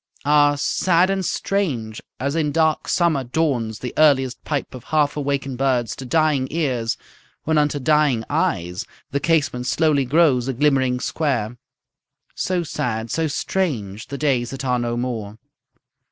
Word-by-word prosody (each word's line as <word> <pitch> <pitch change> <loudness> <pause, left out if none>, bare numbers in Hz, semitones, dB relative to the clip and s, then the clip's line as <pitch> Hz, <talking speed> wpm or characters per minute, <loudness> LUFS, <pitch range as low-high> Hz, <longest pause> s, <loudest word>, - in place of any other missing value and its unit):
Ah, 145 0 +4
sad 180 +5 +2
and 195 -1 -1
strange 135 - -2 0.2
as 140 +4 -1
in 155 -3 +1
dark 160 0 +1
summer 165 -6 +2
dawns 125 -5 -1
The 125 - -6
earliest 135 -4 +3
pipe 145 -3 -3
of 125 -2 -10
half 150 -2 +1
awaken'd 140 -3 -2
birds 125 -4 +1
To 130 - -7
dying 150 -2 +2
ears, 130 -8 -1 0.5
when 155 0 +2
unto 150 -1 +1
dying 145 -4 +2
eyes 90 +1 -1 0.2
The 140 - 0
casement 140 -6 0
slowly 145 +1 +2
grows 135 -3 +3
a 135 - -1
glimmering 130 -2 +2
square; 125 -8 -1 0.8
So 180 -2 -1
sad, 115 -7 -3
so 160 -1 0
strange, 125 - -2
the 140 - -5
days 130 -5 +1
that 135 +1 -6
are 125 -1 +1
no 120 0 -2
more. 115 -4 -4
140 Hz, 150 wpm, -21 LUFS, 125-155 Hz, 0.8 s, Ah